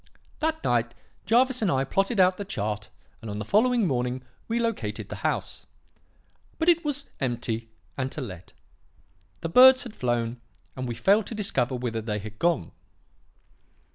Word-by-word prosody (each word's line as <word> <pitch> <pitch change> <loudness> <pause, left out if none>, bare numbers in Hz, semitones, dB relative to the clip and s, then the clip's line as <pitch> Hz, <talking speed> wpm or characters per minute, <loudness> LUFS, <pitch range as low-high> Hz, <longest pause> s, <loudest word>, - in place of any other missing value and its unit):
That 315 +1 -1
night, 120 0 +1 0.3
Jervis 250 +2 +4
and 210 - +2
I 135 -2 +2
plotted 195 - 0
out 185 0 +5
the 205 - -4
chart, 105 - -3 0.3
and 115 - -7
on 105 - -4
the 105 - -4
following 235 - +3
morning 125 -3 -1 0.2
we 230 - -1
located 230 -1 -2
the - - -6
house. - - -3 0.9
But 325 +2 +2
it 340 -1 +4
was 290 -2 -2
empty 115 -3 -2 0.3
and 130 0 -1
to - - -5
let. 95 -8 -8 0.9
The 165 - -3
birds 260 +7 +8
had 235 -3 -9
flown, 120 -1 -1 0.3
and 130 -1 -4
we 120 - -3
failed 200 - +3
to 225 - -5
discover 160 - 0
whither 120 -2 -3
they 105 -1 -2
had 110 +1 -8
gone. 170 - +1
135 Hz, 165 wpm, -26 LUFS, -, 0.9 s, birds